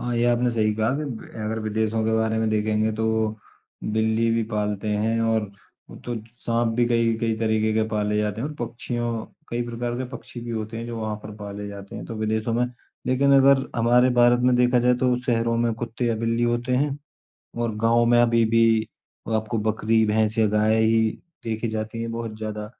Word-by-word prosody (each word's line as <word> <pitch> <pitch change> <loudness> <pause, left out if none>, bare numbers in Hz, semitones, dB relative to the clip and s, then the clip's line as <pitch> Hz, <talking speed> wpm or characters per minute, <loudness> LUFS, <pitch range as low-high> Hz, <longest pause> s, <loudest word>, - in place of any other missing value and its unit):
हाँ, 120 0 -2
ये 120 - +2
आपने 120 0 +2
सही 110 -2 +1
कहा 110 +2 +1
कि 155 - -3
ब 125 -6 -6 0.2
अगर 110 +1 -2
विदेशों 110 +1 -1
के 110 - +1
बारे 110 0 +1
में 110 - +1
देखेंगे 110 0 +1
तो 110 +1 -2 0.9
बिल्ली 110 +1 +1
भी 115 0 +1
पालते 105 -1 -2
हैं 110 +2 0
और 115 -1 +2 0.5
अ, - - -10
तो 120 - -6 0.3
साँप 115 0 0
भी 120 - +4
कई-कई 115 -1 +1
तरीके 110 -1 +1
के 110 - +2
पाले 105 -1 0
जाते 105 0 -1
हैं 140 - -2
और 155 - -8
पक्षियों 120 -1 -3 0.2
कई 120 +1 -1
प्रकार 120 0 -3
के 130 - -2
पक्षी 120 - -11
भी 120 0 -6
होते 110 0 -4
हैं 115 +1 -5
जो 120 -1 -5
वहाँ 110 -1 -2
पर 105 - -8
पाले 105 -1 -7
जाते 100 -1 -9
हैं - - -6
तो 115 - -6
विदेशों 110 +1 -1
में। 120 +1 +2 0.4
लेकिन 135 +2 +3
अगर 135 0 +5
हमारे 120 +2 +4
भारत 120 0 +4
में 125 0 +4
देखा 125 0 +4
जाए 125 +1 +4
तो 125 -1 +3
शहरों 115 -1 +1
में 115 0 +1
कुत्ते 115 +1 -4
या 115 - +1
बिल्ली 115 +1 0
होते 120 +1 0
हैं 145 +1 0 0.6
और 115 -2 -1
गाँव 115 +1 +3
में 120 0 +4
अभी 115 -1 +3
भी 115 -1 +3 0.5
आपको 110 +1 -1
बकरी, 110 +1 +1
भैंस 110 +1 +1
या 110 - +4
गाय 105 +1 +2
ही 115 0 +4 0.4
देखी 115 0 -2
जाती 110 +1 -4
हैं 115 - -3
बहुत 115 -1 -5
ज़्यादा 105 -1 -5
115 Hz, 205 wpm, -24 LUFS, 110-120 Hz, 0.9 s, अगर